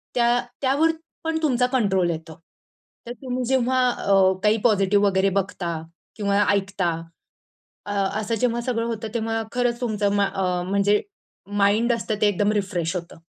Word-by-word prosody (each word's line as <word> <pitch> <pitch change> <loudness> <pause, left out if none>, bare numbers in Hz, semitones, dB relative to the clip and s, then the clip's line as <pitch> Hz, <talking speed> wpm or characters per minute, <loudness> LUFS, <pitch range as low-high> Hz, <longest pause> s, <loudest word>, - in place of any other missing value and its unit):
त्या 240 0 +3 0.2
त्यावर 285 +4 +3 0.3
पण 325 0 -1
तुमचा 250 -4 +2
कंट्रोल 195 -8 +2
येतो, 160 0 -5 0.7
तर - - -5
तुम्ही 255 -1 -3
जेव्हा 260 0 +1
अ, 195 -5 +3
काही 210 +1 +4
पॉझिटिव्ह 205 -2 +3
वगैरे 195 0 +2
बघता 170 -4 -4 0.3
किंवा 205 -1 +1
ऐकता, 200 -2 0 1.0
अ, 205 - -3 0.3
असं 220 +2 -2
जेव्हा 240 +1 0
सगळं 235 -1 -1
होतं 225 -1 -4
तेव्हा 225 -1 -1
खरंच 245 -1 0
तुमचं 210 -4 0
मा 200 -1 +2 0.4
म्हणजे 200 +1 +3 0.6
माइंड 220 +4 +3
असतं 220 -2 -1
ते 215 - +4
एकदम 205 +1 +1
रिफ्रेश 185 -5 -1
होतं. 170 -1 -7
210 Hz, 145 wpm, -23 LUFS, 195-240 Hz, 1.0 s, काही